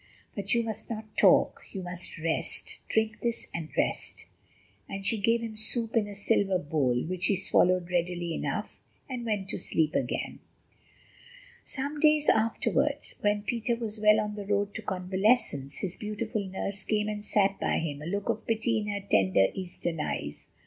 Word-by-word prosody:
But 200 Hz, +2 st, 0 dB
you 235 Hz, -, +2 dB
must 220 Hz, 0 st, -5 dB
not 215 Hz, -2 st, -6 dB
talk, -, -, +5 dB
you 190 Hz, -3 st, -4 dB
must 175 Hz, 0 st, -5 dB
rest. 160 Hz, 0 st, -1 dB
Drink 220 Hz, -1 st, +1 dB
this, 235 Hz, -1 st, -1 dB
and 165 Hz, -2 st, -4 dB
rest," -, -, 0 dB, 0.6 s
and 195 Hz, 0 st, -5 dB
she 225 Hz, +1 st, +2 dB
gave 230 Hz, +3 st, +2 dB
him 225 Hz, -1 st, -5 dB
soup 225 Hz, +2 st, 0 dB
in 215 Hz, -2 st, +3 dB
a 205 Hz, -, -8 dB
silver 195 Hz, -1 st, +2 dB
bowl, 145 Hz, -6 st, 0 dB
which 180 Hz, +2 st, -1 dB
he 200 Hz, -, +3 dB
swallowed 180 Hz, -1 st, +2 dB
readily 175 Hz, -1 st, 0 dB
enough, -, -, -3 dB, 0.3 s
and 245 Hz, -3 st, -5 dB
went 205 Hz, -3 st, -1 dB
to -, -, -2 dB
sleep 160 Hz, -3 st, +1 dB
again. 125 Hz, -, -2 dB, 1.2 s
Some 285 Hz, +2 st, -4 dB
days 305 Hz, 0 st, +5 dB
afterwards, 220 Hz, +1 st, +1 dB
when 205 Hz, 0 st, +1 dB
Peter 235 Hz, +2 st, 0 dB
was 225 Hz, -2 st, -5 dB
well 210 Hz, 0 st, +6 dB
on 210 Hz, -1 st, -2 dB
the 205 Hz, -1 st, -6 dB
road 205 Hz, 0 st, +1 dB
to -, -, -5 dB
convalescence, 190 Hz, -, +1 dB
his 185 Hz, -2 st, -3 dB
beautiful 215 Hz, 0 st, -3 dB
nurse 195 Hz, +1 st, -3 dB
came 210 Hz, -1 st, 0 dB
and 210 Hz, -1 st, -3 dB
sat 200 Hz, -2 st, +2 dB
by -, -, +1 dB
him, 150 Hz, -3 st, -3 dB
a 155 Hz, -, -6 dB
look 200 Hz, +3 st, -2 dB
of 220 Hz, -, -2 dB
pity 225 Hz, 0 st, +1 dB
in 210 Hz, -, -4 dB
her 205 Hz, -1 st, -2 dB
tender, 95 Hz, -, +4 dB
Eastern 175 Hz, -3 st, -4 dB
eyes. -, -, -3 dB
205 Hz, 175 wpm, -29 LUFS, 180-220 Hz, 1.2 s, well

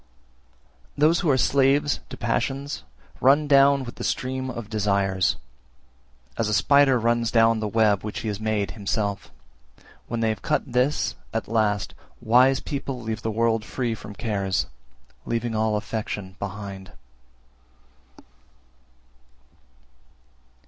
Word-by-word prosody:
347. 150 Hz, +2 st, +4 dB
Those 170 Hz, +2 st, +3 dB
who 175 Hz, -, 0 dB
are 135 Hz, -, +4 dB
slaves 140 Hz, +2 st, +2 dB
to -, -, -8 dB
passions, 135 Hz, +4 st, -2 dB, 0.4 s
run 145 Hz, +3 st, +4 dB
down 140 Hz, -1 st, +5 dB
with 120 Hz, -, -9 dB
the -, -, -6 dB
stream 130 Hz, 0 st, -2 dB
(of 120 Hz, -4 st, -6 dB
desires), 100 Hz, -3 st, +1 dB, 1.0 s
as 110 Hz, -, +1 dB
a 105 Hz, -, +2 dB
spider 140 Hz, +5 st, +5 dB
runs 115 Hz, 0 st, +1 dB
down 115 Hz, -1 st, +4 dB
the 110 Hz, -, -2 dB
web 105 Hz, -2 st, +2 dB
which 105 Hz, -1 st, -5 dB
he 115 Hz, -, -5 dB
has 105 Hz, -1 st, -3 dB
made 110 Hz, -4 st, -1 dB
himself; 100 Hz, -1 st, -3 dB, 0.8 s
when 120 Hz, -, -3 dB
they 115 Hz, -, +2 dB
have 110 Hz, -2 st, -3 dB
cut -, -, 0 dB
this, 130 Hz, +3 st, 0 dB, 0.2 s
at 110 Hz, -, -2 dB
last, 105 Hz, -2 st, 0 dB, 0.3 s
wise 130 Hz, +4 st, +4 dB
people 135 Hz, -3 st, -4 dB
leave 110 Hz, -1 st, -4 dB
the 115 Hz, -, -2 dB
world 115 Hz, 0 st, +1 dB
free 120 Hz, 0 st, -2 dB
from 105 Hz, -1 st, -9 dB
cares, 100 Hz, -5 st, -1 dB, 0.6 s
leaving 115 Hz, 0 st, -1 dB
all 110 Hz, 0 st, +1 dB
affection 105 Hz, -3 st, -5 dB
behind. 100 Hz, -2 st, -7 dB
115 Hz, 130 wpm, -24 LUFS, 105-130 Hz, 1.0 s, down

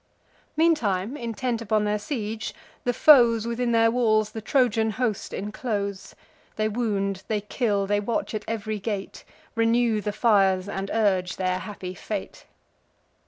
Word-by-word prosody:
Meantime, 240 Hz, -, +2 dB
intent 235 Hz, -1 st, -3 dB
upon 215 Hz, -1 st, +1 dB
their 210 Hz, 0 st, 0 dB
siege, 220 Hz, -1 st, -4 dB, 0.3 s
the 245 Hz, -, +3 dB
foes 235 Hz, -4 st, +6 dB
Within 235 Hz, +1 st, -1 dB
their 225 Hz, 0 st, +4 dB
walls 215 Hz, -3 st, +2 dB
the 220 Hz, -, -6 dB
Trojan 225 Hz, -2 st, +2 dB
host 220 Hz, -2 st, -2 dB
inclose: 200 Hz, -1 st, -4 dB, 0.4 s
They 215 Hz, 0 st, 0 dB
wound, 200 Hz, -4 st, -1 dB
they 215 Hz, -2 st, -1 dB
kill, 210 Hz, -1 st, 0 dB
they 205 Hz, +1 st, +1 dB
watch 225 Hz, +3 st, -2 dB
at 215 Hz, -1 st, -3 dB
ev'ry 215 Hz, -1 st, -3 dB
gate; 200 Hz, -1 st, -5 dB, 0.3 s
Renew 230 Hz, -1 st, +2 dB
the 210 Hz, -, -2 dB
fires, 200 Hz, -4 st, +3 dB
and 195 Hz, -1 st, -4 dB
urge 190 Hz, -5 st, +1 dB
their 185 Hz, 0 st, -1 dB
happy 185 Hz, -3 st, -7 dB
fate. 200 Hz, +1 st, -6 dB
215 Hz, 140 wpm, -25 LUFS, 200-230 Hz, 0.4 s, foes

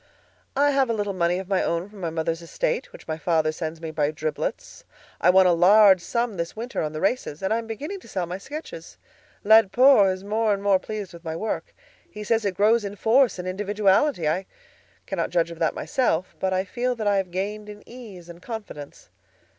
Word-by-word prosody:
I 285 Hz, +1 st, +3 dB
have 270 Hz, -3 st, +2 dB
a -, -, +1 dB
little 205 Hz, -2 st, -2 dB
money 175 Hz, -1 st, +1 dB
of 190 Hz, 0 st, -6 dB
my 190 Hz, -1 st, +1 dB
own 170 Hz, +2 st, -1 dB
from 205 Hz, -1 st, -14 dB
my 170 Hz, -, -2 dB
mother's 165 Hz, +1 st, -2 dB
estate, 485 Hz, -, -2 dB
which -, -, -14 dB
my 160 Hz, 0 st, -4 dB
father 160 Hz, -2 st, +1 dB
sends 160 Hz, 0 st, -5 dB
me 160 Hz, -1 st, -6 dB
by 150 Hz, -2 st, 0 dB
driblets. 155 Hz, 0 st, -4 dB, 0.4 s
I -, -, +3 dB
won 190 Hz, +1 st, +6 dB
a 180 Hz, -, +5 dB
large 190 Hz, +2 st, +6 dB
sum 235 Hz, +1 st, -2 dB
this 170 Hz, 0 st, -4 dB
winter 235 Hz, +4 st, -4 dB
on 155 Hz, -, -2 dB
the 155 Hz, -, -5 dB
races, 195 Hz, -, -2 dB
and 190 Hz, -, +1 dB
I 230 Hz, -, +1 dB
am 230 Hz, -, -8 dB
beginning 295 Hz, -, -6 dB
to -, -, -17 dB
sell 185 Hz, -3 st, -3 dB
my 180 Hz, +3 st, -6 dB
sketches. 275 Hz, -, -9 dB, 0.5 s
Laidpore 220 Hz, +1 st, +6 dB
is 185 Hz, 0 st, -6 dB
more 215 Hz, +1 st, +1 dB
and 200 Hz, -, -9 dB
more 200 Hz, -2 st, +3 dB
pleased 210 Hz, -3 st, -6 dB
with 170 Hz, 0 st, -12 dB
my 160 Hz, -1 st, -4 dB
work; 220 Hz, -, -4 dB, 0.3 s
he 210 Hz, -, -8 dB
says 225 Hz, +1 st, 0 dB
it 190 Hz, -2 st, -2 dB
grows 220 Hz, +2 st, +3 dB
in 200 Hz, 0 st, -5 dB
force 230 Hz, +4 st, +3 dB
and 180 Hz, 0 st, -5 dB
individuality. 200 Hz, -, +1 dB
I 185 Hz, +5 st, -1 dB, 0.6 s
cannot 180 Hz, -4 st, -2 dB
judge 170 Hz, -1 st, 0 dB
of 165 Hz, -, -10 dB
that 165 Hz, -, 0 dB
myself, 185 Hz, -9 st, -1 dB
but 190 Hz, -, -1 dB
I 185 Hz, 0 st, +1 dB
feel 245 Hz, +5 st, -2 dB
that 220 Hz, -2 st, -5 dB
I 205 Hz, -1 st, +3 dB
have 190 Hz, -2 st, -1 dB
gained 205 Hz, +4 st, -4 dB
in 210 Hz, 0 st, -12 dB
ease 215 Hz, -8 st, -11 dB
and 170 Hz, 0 st, -12 dB
confidence. 205 Hz, -11 st, -9 dB
195 Hz, 220 wpm, -24 LUFS, 170-220 Hz, 0.6 s, won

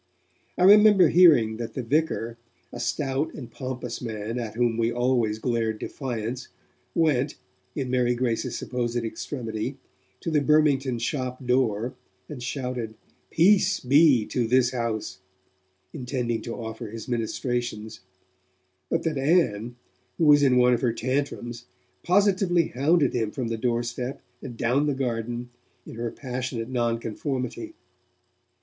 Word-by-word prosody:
I -, -, +2 dB
remember 205 Hz, -2 st, +7 dB
hearing 145 Hz, -11 st, +5 dB
that 115 Hz, -1 st, -6 dB
the 130 Hz, -, -3 dB
vicar, 120 Hz, -3 st, -1 dB, 0.3 s
a -, -, -7 dB
stout 145 Hz, +2 st, -1 dB
and 120 Hz, -5 st, -9 dB
pompous 125 Hz, -2 st, -5 dB
man 110 Hz, 0 st, -4 dB
at 115 Hz, -2 st, -5 dB
whom 120 Hz, -1 st, +1 dB
we 115 Hz, 0 st, +1 dB
always 120 Hz, -3 st, +1 dB
glared 115 Hz, -2 st, -1 dB
defiance, 120 Hz, -1 st, -5 dB, 0.5 s
went, 150 Hz, -4 st, +2 dB, 0.4 s
in 130 Hz, -3 st, -3 dB
Mary 125 Hz, -1 st, +2 dB
Grace's 120 Hz, -2 st, -1 dB
supposed 120 Hz, -1 st, -2 dB
extremity, 115 Hz, +1 st, -4 dB, 0.4 s
to 165 Hz, -, -3 dB
the 150 Hz, -2 st, +3 dB
Burmingtons' 140 Hz, -5 st, +2 dB
shop 130 Hz, -1 st, -3 dB
door, 120 Hz, -2 st, +1 dB, 0.3 s
and 145 Hz, -5 st, -8 dB
shouted: 125 Hz, -3 st, -4 dB, 0.3 s
'Peace 190 Hz, +2 st, +4 dB
be 135 Hz, -3 st, +5 dB
to 120 Hz, 0 st, -1 dB
this 125 Hz, +1 st, +3 dB
house,' 115 Hz, -6 st, -3 dB, 0.7 s
intending 125 Hz, -4 st, -2 dB
to 115 Hz, -, -5 dB
offer 115 Hz, 0 st, -6 dB
his 115 Hz, +1 st, -8 dB
ministrations, 120 Hz, -2 st, -3 dB, 0.9 s
but -, -, 0 dB
that 155 Hz, -4 st, -1 dB
Ann, 125 Hz, -, +1 dB, 0.4 s
who 165 Hz, -, +2 dB
was 145 Hz, -1 st, +7 dB
in 130 Hz, -3 st, +4 dB
one 125 Hz, 0 st, +5 dB
of 120 Hz, -, 0 dB
her 120 Hz, -3 st, +1 dB
tantrums, 120 Hz, -1 st, -3 dB, 0.4 s
positively 185 Hz, -3 st, +2 dB
hounded 145 Hz, +2 st, +2 dB
him 115 Hz, -3 st, 0 dB
from 120 Hz, +1 st, -4 dB
the 115 Hz, -, -1 dB
doorstep 120 Hz, +2 st, -2 dB, 0.2 s
and 120 Hz, -, -8 dB
down 130 Hz, +6 st, +1 dB
the 145 Hz, -, 0 dB
garden, 120 Hz, -1 st, -3 dB, 0.3 s
in -, -, -10 dB
her 115 Hz, +1 st, -3 dB
passionate 125 Hz, -2 st, -5 dB
nonconformity. 125 Hz, -, -3 dB
125 Hz, 135 wpm, -25 LUFS, 115-140 Hz, 0.9 s, remember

